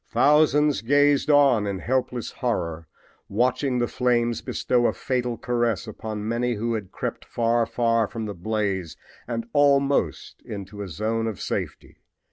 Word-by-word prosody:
Thousands 150 -3 +4
gazed 145 +4 +3
on 135 -8 +5
in 100 -1 -2
helpless 125 +2 -2
horror, 85 - -3 0.4
watching 125 +4 +1
the 120 -1 +1
flames 120 -2 0
bestow 120 -1 +1
a - - 0
fatal 125 -2 -2
caress 120 -6 -1
upon 110 -1 -6
many 120 +1 0
who 115 +2 -2
had 105 -5 -4
crept - - -4
far, 115 0 +1
far 115 -2 +1
from 115 0 -5
the 105 - -4
blaze 95 -2 -2 0.3
and 115 -1 -3
almost 140 -1 +2
into 100 0 -7
a 100 - -4
zone 110 +7 -2
of 110 -4 -4
safety. - - -5
115 Hz, 145 wpm, -24 LUFS, 105-125 Hz, 0.4 s, on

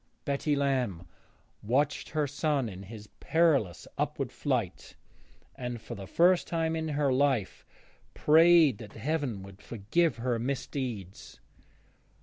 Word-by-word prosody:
Betty 140 +1 0
Lamb 130 -11 -1 0.6
watched 140 +7 0
her 150 -1 0
son 140 -2 -1
in 95 -3 -8
his 105 +1 -10
perilous 140 - +1
upward - - -2
flight, - - -3 0.6
and, 125 -2 -5
for - - -8
the 95 -1 -8
first 175 - +3
time 165 -1 -1
in 160 0 -2
her 145 -3 +1
life, 130 -7 0 0.5
prayed 160 -5 +5
that 105 -2 -10
Heaven 140 -9 -2
would 95 0 -13
forgive 125 - 0
her 120 0 -1
misdeeds. 120 -6 -5
135 Hz, 125 wpm, -29 LUFS, 110-150 Hz, 0.6 s, prayed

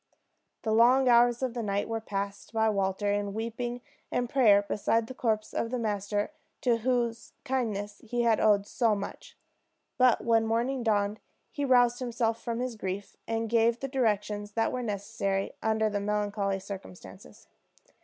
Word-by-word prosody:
The 220 - -1
long 250 +4 +5
hours 240 +1 +5
of 255 -3 -1
the 240 - -3
night 200 -2 -1
were 225 0 -3
passed 200 0 -5
by 220 -1 +2
Walter 200 0 0
in 205 0 -2
weeping 240 +2 -4 0.3
and 245 0 0
prayer 220 -6 +5
beside 220 +2 0
the 260 - -8
corpse 220 -4 -1
of 230 - -1
the 250 - -2
master 205 0 -1 0.3
to 240 -2 +3
whose 235 -1 -1
kindness 210 -6 -2
he 240 +1 -1
had 230 -2 +3
owed 205 -2 +4
so 225 0 +1
much; 200 0 -7 0.6
but 250 -2 +4
when 225 -1 +3
morning 240 +4 0
dawned 210 -2 +1 0.3
he 285 - -3
roused 245 -2 +4
himself 235 -2 -1
from 235 0 -3
his 250 -2 -3
grief, 195 -1 -5
and 225 0 -1
gave 230 +1 +2
the 275 - -3
directions 210 -5 -1
that 225 +1 +1
were 255 - -2
necessary 200 -2 -2
under 220 0 +1
the 205 -1 -1
melancholy 205 -1 -1
circumstances. 190 0 -10
225 Hz, 165 wpm, -29 LUFS, 205-240 Hz, 0.6 s, long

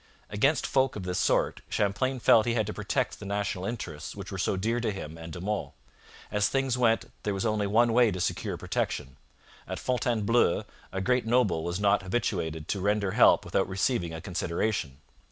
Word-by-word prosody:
Against 135 +9 +2
folk 135 -1 +1
of 105 - -5
this 90 -1 -2
sort - - +1
Champlain 130 +6 0
felt 115 -1 +5
he 120 - +1
had 110 -2 +1
to 105 - -4
protect - - -2
the 105 - -8
national 100 -2 -2
interests 85 -9 -5
which 100 -2 -8
were 95 - -5
so 95 - 0
dear 115 +5 0
to 115 -2 -1
him 80 -5 -7
and 80 0 -9
De 85 - -7
Monts. 105 +3 -3 0.6
As 105 0 +2
things 135 +1 0
then 125 - -1
went, 115 -1 +2
there 105 -1 -2
was 95 - -2
only 105 -2 +1
one 115 +3 +3
way 120 -1 +5
to 90 - -4
secure - - -2
protection. 65 -3 -3 0.5
At - - -4
Fontainebleau 120 -5 +1 0.3
a 95 - -3
great 125 +4 +1
noble 115 -9 +2
was 85 +2 -2
not 100 0 +3
habituated 90 -6 -2
to 100 - -1
render 100 0 +1
help - - +5
without 95 - 0
receiving 95 -2 0
a 80 0 -6
consideration. 90 -4 -2
105 Hz, 195 wpm, -28 LUFS, 90-115 Hz, 0.6 s, felt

